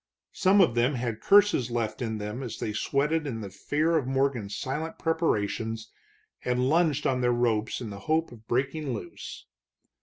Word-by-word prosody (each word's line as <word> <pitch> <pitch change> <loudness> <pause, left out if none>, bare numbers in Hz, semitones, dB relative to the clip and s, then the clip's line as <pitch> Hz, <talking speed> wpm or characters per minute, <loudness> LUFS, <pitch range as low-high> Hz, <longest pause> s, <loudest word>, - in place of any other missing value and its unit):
Some 195 +2 +4
of 150 -11 +4
them 120 +4 +2
had 115 -3 -3
curses 200 - +5
left 115 -1 -2
in 110 -2 -2
them 105 +4 -5
as 125 -5 -5
they 105 - -3
sweated 150 +7 0
in 115 -5 -4
the 100 -2 -7
fear 155 - 0
of 135 -5 -1
Morgan's 130 -6 0
silent 150 +5 -3
preparations 115 -8 -1 0.5
and 125 +1 +1
lunged 155 -1 +2
on 130 -1 +1
their 120 0 +3
ropes 115 -2 0
in 110 -4 -5
the 100 - -7
hope 160 +1 +2
of 110 -2 -14
breaking 135 +2 -1
loose. 100 - -8
125 Hz, 175 wpm, -28 LUFS, 115-150 Hz, 0.5 s, curses